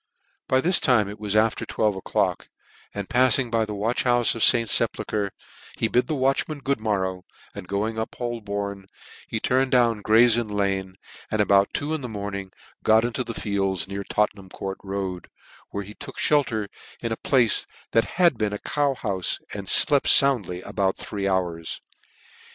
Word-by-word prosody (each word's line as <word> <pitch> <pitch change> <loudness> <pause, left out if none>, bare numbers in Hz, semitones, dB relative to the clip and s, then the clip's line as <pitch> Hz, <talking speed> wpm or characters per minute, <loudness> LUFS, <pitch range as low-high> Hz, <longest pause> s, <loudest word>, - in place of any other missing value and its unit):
By 130 0 +3
this 175 +3 +4
time 120 -7 +3
it 105 +1 -8
was 105 -1 -2
after 110 +1 +2
twelve 105 -2 0
o'clock, 95 - -1 0.4
and 100 -2 -5
pafling 130 -1 +2
by 115 -1 +2
the 105 -1 -6
watch 110 +4 0
houfe 120 -1 +3
of 115 - -1
St. 115 -2 +5
Sepulchre, 105 -1 0 0.5
he - - +1
bid 125 +2 +1
the 155 - -1
watchman 135 +3 0
good 140 -2 -1
morrow, 95 -4 -1 0.3
and 90 - -9
going 110 +3 -2
up 110 - -4
Holborn, 100 -5 -4 0.4
he 110 - -3
turned 130 +3 +1
down 120 -4 +3
Gray's 115 +2 +5
Inn 115 - -3
Lanc, 95 -2 -2 0.3
and 110 - -2
about 100 -1 +4
two 150 +2 -2
in 155 - -2
the 125 - -5
morning 100 -2 -5 0.3
got 110 +1 +4
into 120 +2 -2
the 115 -1 -6
fields 95 -3 -1
near 100 +1 -5
Tottenham 105 -2 -1
Court, 95 +1 -6 0.9
where 100 - -4
he 100 +2 -10
took 135 +3 -10
flicker 130 -8 +1 0.3
in 115 - -4
a 110 - -2
place 125 -5 +2 0.2
that 115 - 0
had 170 -9 +4
been 105 -1 0
a - - -2
cow 145 +4 0
houfe, 95 -7 -1 0.2
and 100 -2 -5
flept 145 -2 +5
found 135 -9 +5
ly 90 0 -6
about 95 -1 -1
three 100 -2 -4
hours. 90 -4 -2
110 Hz, 175 wpm, -24 LUFS, 100-125 Hz, 0.9 s, St